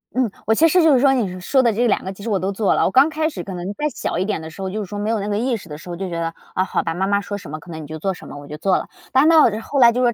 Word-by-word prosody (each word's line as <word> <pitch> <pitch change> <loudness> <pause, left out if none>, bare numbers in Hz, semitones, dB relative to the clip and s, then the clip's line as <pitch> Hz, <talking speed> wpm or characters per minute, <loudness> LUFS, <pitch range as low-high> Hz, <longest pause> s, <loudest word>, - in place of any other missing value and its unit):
嗯， 250 -5 +1
我 220 - +3
其 325 +5 +5
实 360 +2 +4
就 315 -3 +5
是 255 - +5
说， 275 -1 +5
你 190 -8 -1
说 265 +7 +3
的 235 -3 +2
这 240 +4 +1
2 220 - +1
个 190 +1 -5
其 200 - -12
实 230 - -3
我 195 -3 +1
都 190 +2 -1
做 200 0 +1
了。 - - +2
我 - - +1
刚 275 +4 +5
开 315 0 -1
始 180 - -6
可 195 - -7
能 180 +3 -5
再 300 +6 -1
小 - - -3
一 185 - +1
点 200 -5 -2
的 160 - -7
时 175 +4 -11
候， 190 - -2
就 215 +3 -3
是 - - -8
说 205 - -5
没 210 +2 -2
有 225 -2 +1
那 200 - -3
个 205 0 -1
意 240 0 0
识 185 - -13
的 150 -1 -7
时 175 - -12
候， 175 - -4
就 190 0 -4
觉 170 - -4
得， 165 0 -1 0.3
哦， 185 - +2
好 - - -1
吧， 165 - -3
妈 190 +3 -1
妈 200 0 +2
说 205 0 -5
什 150 -7 -10
么 155 - -5
可 175 - -16
能 160 -1 -7
你 - - -8
就 155 0 -7
做 190 +3 -1
什 - - -12
么， 145 - -9
我 145 0 -10
就 150 - -7
做 190 +3 +2
了。 - - -5 0.2
但 265 +4 +5
到 325 -2 +7 0.2
后 280 +4 -2
来 235 -1 +8
就 250 +1 +1
是 240 - +3
200 Hz, 420 characters per minute, -21 LUFS, 180-245 Hz, 0.3 s, 来